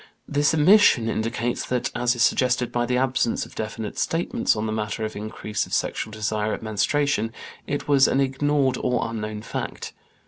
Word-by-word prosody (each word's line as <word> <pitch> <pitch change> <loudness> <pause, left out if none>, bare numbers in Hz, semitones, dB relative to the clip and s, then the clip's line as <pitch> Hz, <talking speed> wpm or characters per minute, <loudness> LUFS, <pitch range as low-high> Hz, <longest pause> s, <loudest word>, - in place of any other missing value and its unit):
This 145 0 +2
omission 155 - +5
indicates 115 +2 -1
that, 125 -1 -1
as 125 0 +1
is 120 - +2
suggested 125 -1 +2
by 120 0 0
the 125 +1 +1
absence 130 -2 0
of - - -15
definite 110 0 -5
statements 165 -7 0
on 105 +1 -2
the 110 - -2
matter 110 0 -2
of 110 - -6
increase 105 0 -4
of - - -1
sexual - - -1
desire 110 0 -2
at - - -11
menstruation, 115 +3 0 0.4
it 145 +1 -3
was 140 -2 +5
an 135 - +1
ignored 135 -1 +1
or 125 -2 0
unknown 105 -2 -5
fact. - - -5
120 Hz, 175 wpm, -24 LUFS, 110-135 Hz, 0.4 s, omission